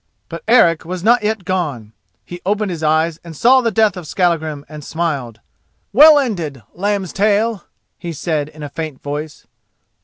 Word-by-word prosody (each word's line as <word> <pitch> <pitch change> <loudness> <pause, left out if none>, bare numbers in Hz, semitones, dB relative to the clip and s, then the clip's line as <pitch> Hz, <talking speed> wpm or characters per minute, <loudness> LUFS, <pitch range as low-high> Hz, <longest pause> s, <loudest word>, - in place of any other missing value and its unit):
But 165 0 -7
Eric 170 -9 +4
was 180 +1 -6
not 240 +3 +4
yet 210 -3 -2
gone. 145 - -3 0.3
He 175 0 -9
opened 205 +1 -1
his 165 -3 -5
eyes 160 +1 +1
and 165 -3 -10
saw 260 +2 +5
the 235 - +1
death 220 -3 +2
of 180 -4 -8
Skallagrim 160 -5 -1
and 150 -1 -10
smiled. 140 -9 -3 0.5
"Well 300 +6 +8
ended, 170 - -2
Lambstail!" 205 +2 0 0.3
he 170 - -5
said 155 -1 -2
in 155 0 -11
a 145 - -5
faint 155 -3 -6
voice. 150 +1 -6
170 Hz, 160 wpm, -18 LUFS, 155-210 Hz, 0.5 s, Well